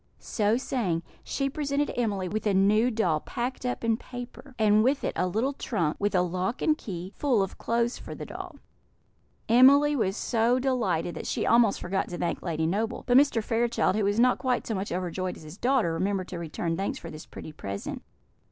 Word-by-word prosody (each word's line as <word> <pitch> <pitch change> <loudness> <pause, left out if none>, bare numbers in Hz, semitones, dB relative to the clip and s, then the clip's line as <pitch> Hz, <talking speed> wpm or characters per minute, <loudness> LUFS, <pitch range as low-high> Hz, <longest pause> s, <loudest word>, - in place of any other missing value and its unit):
So 215 +1 0
saying, 200 -11 -1 0.2
she 275 - -1
presented 285 0 -1
Emily 205 -6 -1
with 215 +3 -2
a 200 - +2
new 210 +5 +4
doll 190 -10 +1
packed 250 +6 -4
up 250 - -3
in 225 -1 +2
paper, 245 +2 -10
and 215 -1 +4
with 270 +3 +1
it - - -1
a 180 - +1
little 225 +10 0
trunk, 175 - -1
with 205 0 0
a 180 - +4
lock 185 +6 -2
and 310 - +3
key, 185 - -7
full 250 -9 +2
of 195 - -6
clothes 235 +1 0
for - - -8
the - - -7
doll. - - -8 0.9
Emily 280 +5 +6
was 200 -5 0
so 235 +2 +2
delighted 225 -11 0
that 160 - -6
she - - -1
almost 230 -3 +4
forgot 190 +2 -2
to 175 - -5
thank 175 - -2
Lady 160 -2 -1
Noble; 220 +8 -1
but 245 - +2
Mr. 265 -5 +5
Fairchild, 230 -3 +1
who 215 - +1
was 205 +2 +1
not 250 +1 +4
quite 255 -2 0
so 225 - -2
much 195 0 -3
overjoyed 185 0 -3
as - - -13
his 155 +6 -11
daughter, 245 -10 +2
remembered 185 +2 -1
to 175 - -5
return 165 0 -3
thanks 195 +3 -2
for 165 - -8
this 155 0 -10
pretty - - -9
present. 100 -9 -6
215 Hz, 205 wpm, -27 LUFS, 180-245 Hz, 0.9 s, Emily